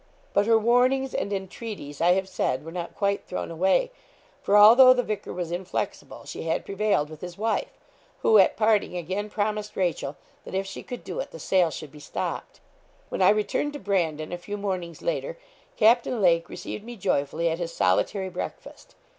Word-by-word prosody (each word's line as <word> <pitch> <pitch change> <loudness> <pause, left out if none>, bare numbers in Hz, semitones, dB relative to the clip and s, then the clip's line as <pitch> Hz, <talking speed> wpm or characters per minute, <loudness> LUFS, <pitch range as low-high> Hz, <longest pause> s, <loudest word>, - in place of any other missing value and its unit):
But 200 +1 +3
her 225 -1 +6
warnings 250 +4 +2
and 200 - -2
entreaties, 195 -6 -6
I 175 +1 +5
have 190 +1 -1
said, 140 -6 -1
were 165 - -7
not 175 0 -6
quite 200 -1 0
thrown 180 - -4
away; 190 - +2 0.5
for, 205 - +3
although 245 +5 +9
the 250 - +1
vicar 215 -2 -4
was 175 -2 -4
inflexible, 175 +1 -4
she - - -7
had 160 0 -1
prevailed 200 -6 +1
with 155 0 -12
his 175 -1 -7
wife, 220 +2 -2 0.5
who, 220 - +6
at 190 - +4
parting, 215 -4 +2
again 190 +5 -3
promised 210 0 -2
Rachel, 170 -6 -1 0.3
that - - -7
if 195 +1 0
she 195 - -7
could 245 - -8
do - - -5
it, - - -4
the - - -10
sale 180 -3 +2
should 150 -1 -8
be 150 - -13
stopped. 145 - -5 0.5
When - - -3
I 185 - +7
returned 215 +7 +1
to 290 - -6
Brandon, 165 - -1
a 175 - -4
few 205 +4 -6
mornings 185 -4 -4
later, - - -2 0.4
Captain 235 +2 +4
Lake 170 -4 +3
received 210 - -7
me 240 +2 -8
joyfully 165 -4 0
at 165 +1 -1
his 170 -1 -3
solitary 190 - +1
breakfast. 185 - -8
195 Hz, 190 wpm, -26 LUFS, 170-215 Hz, 0.5 s, although